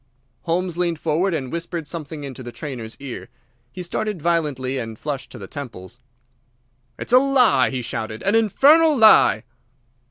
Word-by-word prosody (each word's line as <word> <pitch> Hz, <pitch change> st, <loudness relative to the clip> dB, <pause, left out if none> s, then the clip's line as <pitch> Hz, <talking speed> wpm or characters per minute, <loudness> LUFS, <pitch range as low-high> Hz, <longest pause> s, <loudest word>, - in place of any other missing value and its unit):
Holmes 175 Hz, 0 st, -1 dB
leaned 170 Hz, -2 st, 0 dB
forward 165 Hz, +5 st, 0 dB
and 135 Hz, -6 st, -3 dB
whispered 170 Hz, -1 st, -5 dB
something 155 Hz, -2 st, -7 dB
in 140 Hz, -1 st, -6 dB
the 125 Hz, -1 st, -9 dB
trainer's 120 Hz, -6 st, -7 dB
ear. 135 Hz, -3 st, -8 dB, 0.4 s
He 180 Hz, -, -7 dB
started 210 Hz, +2 st, -3 dB
violently 145 Hz, -6 st, -1 dB
and 115 Hz, -2 st, -6 dB
flushed 145 Hz, 0 st, -5 dB
to -, -, -9 dB
the 100 Hz, -, -8 dB
temples. 120 Hz, -3 st, -9 dB, 1.0 s
"It's -, -, -5 dB
a 250 Hz, -, +9 dB
lie!" 255 Hz, -, +3 dB
he 130 Hz, -2 st, -4 dB
shouted, 110 Hz, -1 st, -5 dB
"an 200 Hz, -, +1 dB
infernal 285 Hz, -, +5 dB
lie!" 215 Hz, -, +6 dB
155 Hz, 155 wpm, -21 LUFS, 130-185 Hz, 1.0 s, a